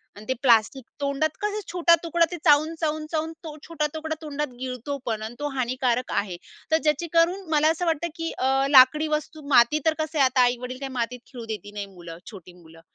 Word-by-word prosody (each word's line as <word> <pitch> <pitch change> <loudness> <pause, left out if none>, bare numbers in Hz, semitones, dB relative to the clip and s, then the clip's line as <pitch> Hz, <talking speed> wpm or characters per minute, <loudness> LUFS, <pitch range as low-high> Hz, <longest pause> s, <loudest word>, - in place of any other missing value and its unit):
आणि 205 +1 -12
ते - - +3
प्लास्टिक 240 +1 +3 0.2
तोंडात 280 +2 -1
कसं 420 0 -1
छोटा 340 -1 +5
तुकडा 335 0 +2
ते 350 - -4
चावून, 310 +1 +4
चावून, 310 -1 -1
चावून 320 0 -1
तो 310 -2 -7
छोटा 315 -2 -1
तुकडा 315 0 -4
तोंडात 295 -1 -3
गिळतो 255 +2 -4
पण 220 -2 -2
आणि 220 +2 -6
तो 290 - -2
हानिकारक 250 -1 0
आहे. 190 -4 -2 0.3
तर 320 - +5
ज्याची 300 +2 +1
करून 345 +2 +2
मला 305 0 +4
असं 335 +2 -2
वाटतं, 330 0 0
की 330 0 -4
अ, 270 +1 +1
लाकडी 285 +3 +6
वस्तू 310 +1 -10
माती 260 +2 +5
तर 320 - +4
कसं 315 0 -3
आहे 275 - +6
आता 255 0 +3
आई-वडील 250 +1 -1
काही 275 -1 -5
मातीत 250 0 -3
खेळू 240 -4 -9
देत 210 -2 -6
नाही 205 -1 -4
मुलं, 175 -3 -11
छोटी 185 -4 -12
मुलं 165 -2 -17
280 Hz, 210 wpm, -25 LUFS, 240-315 Hz, 0.3 s, लाकडी